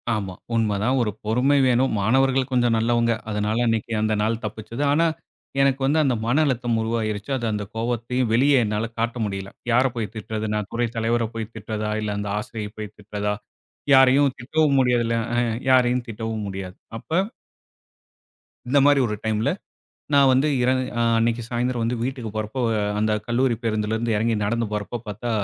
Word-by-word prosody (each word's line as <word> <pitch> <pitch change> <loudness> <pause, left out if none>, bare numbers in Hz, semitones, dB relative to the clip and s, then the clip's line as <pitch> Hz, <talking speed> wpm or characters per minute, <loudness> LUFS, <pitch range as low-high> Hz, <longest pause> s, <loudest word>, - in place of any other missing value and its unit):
ஆமா, 95 -3 -4 0.2
உண்மதான் 110 +3 +1
ஒரு 105 -3 0
பொறுமை 125 +6 +3
வேணும். 125 +2 +2
மாணவர்கள் 130 +4 +2
கொஞ்சம் 120 -2 +2
நல்லவங்க. 115 +1 +2 0.2
அதனால 105 +3 0
அன்னைக்கு 115 0 -1
அந்த 110 0 +1
நாள் 115 +1 0
தப்பிச்சது. 115 +6 -5
ஆனா, 165 +3 +3 0.6
எனக்கு 135 0 +2
வந்து 150 +3 +3
அந்த 130 -4 +2
மன 130 +7 +3
அழுத்தம் 120 -3 0
உருவாகிருச்சு, 110 +1 -2
அது 120 - -4
அந்த 105 -1 -2
கோவத்தையும் 120 +1 -1
வெளிய 135 +1 +4
என்னால 105 +1 -1
காட்ட 115 +1 -1
முடியல. 95 -1 -4 0.2
யார 125 +3 +4
போய் 110 -3 -3
திட்றது 110 0 -4
நான் 105 -1 -3
துறை 120 0 +1
தலைவர 115 +1 +1
போய் 110 0 -5
திட்றதா 110 0 -4
இல்ல, 105 - -2
அந்த 105 0 -3
ஆசிரியர 105 -1 -5
போய் 105 -1 -7
திட்றதா, 105 0 -3 0.6
யாரையும் 135 +1 +6
திட்டவும் 140 +3 +2
முடியறதுல்ல 120 -2 +2 0.2
அ - - +1 0.3
யாரையும் 125 -1 +3
திட்டவும் 110 -1 -4
முடியாது. 95 -1 -6 0.2
அப்ப - - -14 1.6
இந்த 140 +1 +4
மாரி 145 -1 +5
ஒரு 105 - -2
டைம்ல 110 0 +1 0.6
நான் 140 -2 +6
வந்து 135 +4 +3
இர 125 - +3 0.3
அ - - +3 0.2
அன்னைக்கு 115 +1 +1
சாயந்திரம் 120 0 -1
வந்து 120 +2 0
வீட்டுக்கு 125 -3 -3
போறப்ப 110 +4 -3 0.4
அந்த 110 0 +1
கல்லூரி 120 +1 +2
பேருந்திலிருந்து 110 +1 -1
எறங்கி 115 +2 +1
நடந்து 115 +2 0
போறப்போ 105 +2 -3
பார்த்தா 110 +4 -4
115 Hz, 160 wpm, -23 LUFS, 110-125 Hz, 1.6 s, யாரையும்